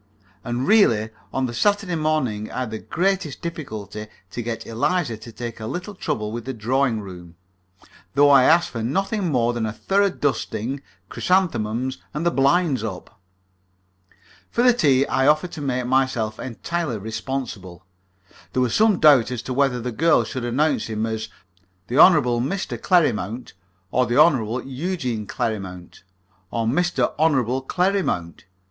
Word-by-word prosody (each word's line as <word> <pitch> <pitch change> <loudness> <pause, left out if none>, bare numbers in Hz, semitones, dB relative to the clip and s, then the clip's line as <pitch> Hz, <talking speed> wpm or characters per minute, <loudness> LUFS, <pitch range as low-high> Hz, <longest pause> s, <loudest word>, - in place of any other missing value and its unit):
And, 120 +2 -2
really, 115 - +4 0.2
on 130 0 0
the 120 - -4
Saturday 200 - +1
morning 155 -10 -1
I 130 - -3
had 125 -4 -4
the 110 - -4
greatest 185 -5 -1
difficulty 110 - -6 0.2
to 120 - -4
get 115 0 -5
Eliza 120 +3 0
to 115 +2 -11
take 120 0 -7
a 110 - -5
little 180 - -5
trouble 110 - -3
with 115 0 -6
the 130 -1 -4
drawing 120 +1 0
room, 90 -3 -11 0.8
though 145 0 +6
I 135 -2 +7
asked 170 +1 +4
for 115 - -4
nothing 195 - -1
more 120 -3 +2
than 115 -2 -2
a - - -3
thorough 195 - +1
dusting, 135 - -2 0.3
chrysanthemums, 130 - 0 0.2
and 155 +3 -2
the 170 - +3
blinds 140 -2 +2
up. 105 +1 -7 1.3
For 240 - 0
the 250 -1 +6
tea 140 - +3
I 130 0 +1
offered 155 +4 +3
to 155 - -7
make 130 -3 -1
myself 125 -4 0
entirely 135 +2 -3
responsible. 110 -4 -5 0.7
There 130 - +1
was 120 - -1
some 215 -4 +3
doubt 140 -7 +6
as 125 -2 -4
to 130 - -4
whether 135 -2 +1
the 125 +1 -4
girl 165 +8 +3
should 130 -2 -5
announce 145 +6 +1
him 110 0 -2
as 110 -1 -4 0.6
the 125 +5 +1
Hon. 185 - +9 0.3
Mr. 190 +10 -3
Clerrimount, 125 - +1 0.4
or 125 0 +2
the 120 +3 0
Hon. 130 -7 +3
Eugene 130 - -3
Clerrimount, 95 -5 -4 0.5
or 115 +1 -2
Mr. 175 +10 +1
Hon. 160 0 +4 0.3
Clerrimount. 180 - -1
130 Hz, 155 wpm, -22 LUFS, 110-160 Hz, 1.3 s, Hon